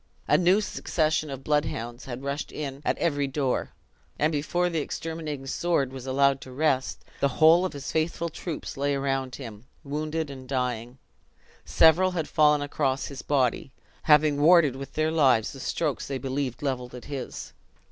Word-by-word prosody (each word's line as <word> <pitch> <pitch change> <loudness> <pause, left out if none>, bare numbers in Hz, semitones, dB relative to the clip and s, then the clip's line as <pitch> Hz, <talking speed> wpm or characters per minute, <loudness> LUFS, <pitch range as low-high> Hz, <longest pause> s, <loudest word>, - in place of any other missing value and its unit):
A - - +4
new 180 +4 +4
succession 155 -6 -1
of 135 -1 -7
blood 150 +1 +2
hounds 120 +2 -6
had 130 0 -7
rushed 140 +2 -3
in 140 -2 -5
at - - 0
every 145 -4 0
door; 135 -1 -1 0.5
and 155 +2 +2
before 165 +4 0
the 165 -2 -1
exterminating 155 -2 -5
sword 140 -2 0
was 130 -1 -8
allowed 135 0 +2
to 130 - -10
rest, 135 -1 0
the 140 - +3
whole 165 +3 +6
of 185 - -3
his 140 -1 -6
faithful 165 +1 -1
troops 165 -2 -6
lay 140 +1 0
around 135 -2 -1
him, 115 -4 -9 0.2
wounded 155 +1 -3
and 130 -2 -10
dying. 125 -2 -2 0.7
Several 165 +4 +5
had 165 -4 -2
fallen 150 -1 +3
across 140 -2 -1
his 140 -3 -7
body, 135 +1 0 0.3
having 150 -1 +4
warded 160 -4 +6
with 135 0 -8
their 155 +1 +1
lives 130 -8 +3
the 135 - -10
strokes 150 +1 -2
they 135 - -3
believed 130 -1 -3
leveled 125 -3 -3
at 125 - -10
his. 140 -3 -6
140 Hz, 170 wpm, -26 LUFS, 130-155 Hz, 0.7 s, whole